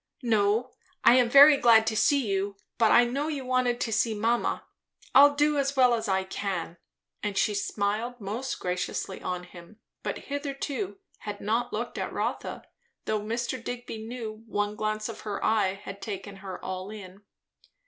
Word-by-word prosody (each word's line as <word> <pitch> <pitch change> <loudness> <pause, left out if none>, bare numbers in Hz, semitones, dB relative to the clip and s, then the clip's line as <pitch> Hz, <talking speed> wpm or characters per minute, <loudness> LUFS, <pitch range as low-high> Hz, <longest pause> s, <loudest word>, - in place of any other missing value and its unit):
No, 225 +2 +2 0.3
I - - +8
am 245 -2 +4
very 285 +3 +9
glad 230 -3 +6
to 220 0 -1
see 280 +3 +3
you; 195 0 -1 0.2
but 225 -2 +5
I 240 - +7
know 275 +5 -2
you 285 -4 -4
wanted 255 -1 +1
to 225 - -1
see 220 0 +1
mamma. 230 +3 0 0.5
I'll 285 +1 +8
do 295 0 +2
as 275 0 0
well 250 -2 +5
as 225 -1 -1
I 190 -1 +1
can." 190 -3 -4 0.4
And 205 -2 -3
she 210 +1 +2
smiled 210 +4 -2
most 230 +6 -4
graciously 180 0 -3
on 180 -1 -3
him, 180 +4 -14 0.2
but - - -3 0.2
hitherto 285 +6 -3 0.2
had 205 -1 -6
not 225 +4 -1
looked - - -4
at - - -3
Rotha, - - -3 0.4
though 215 -1 0
Mr. 235 +3 -3
Digby 245 -2 -6
knew 220 -1 -7
one 205 -1 -1
glance 215 0 -2
of 230 - -7
her 210 -2 -4
eye 210 -3 +2
had 195 0 -9
taken 200 -1 -6
her 190 -1 -7
all 185 +1 -4
in. 200 -2 -10
220 Hz, 170 wpm, -27 LUFS, 200-245 Hz, 0.5 s, very